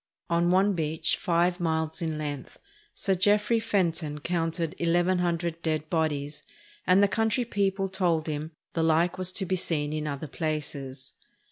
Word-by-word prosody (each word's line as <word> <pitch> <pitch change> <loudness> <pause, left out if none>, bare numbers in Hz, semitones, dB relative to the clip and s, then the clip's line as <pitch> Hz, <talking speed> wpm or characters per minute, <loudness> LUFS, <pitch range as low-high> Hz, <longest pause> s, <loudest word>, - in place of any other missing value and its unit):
On 170 +1 +3
one 190 +3 +4
beach, 160 -2 0
five 175 0 +1
miles 160 0 -1
in 160 -2 -2
length, 145 -3 -5 0.4
Sir 195 - +1
Jeffrey 210 +4 +3
Fenton 170 -8 0
counted 165 0 -1
eleven 175 +2 +2
hundred 170 -1 -1
dead 155 -2 -2
bodies, 150 -3 -1 0.5
and 185 +2 +6
the - - +6
coimtry 225 +4 0
people 195 -3 0
told 175 -4 +1
him 155 0 -3 0.2
"the 165 - 0
like 165 +3 +2
was 185 0 0
to 190 - -1
be 185 +1 0
seen 155 -4 -1
in 155 0 -2
other 140 +1 -4
places." 140 -4 -4
170 Hz, 155 wpm, -27 LUFS, 155-185 Hz, 0.5 s, and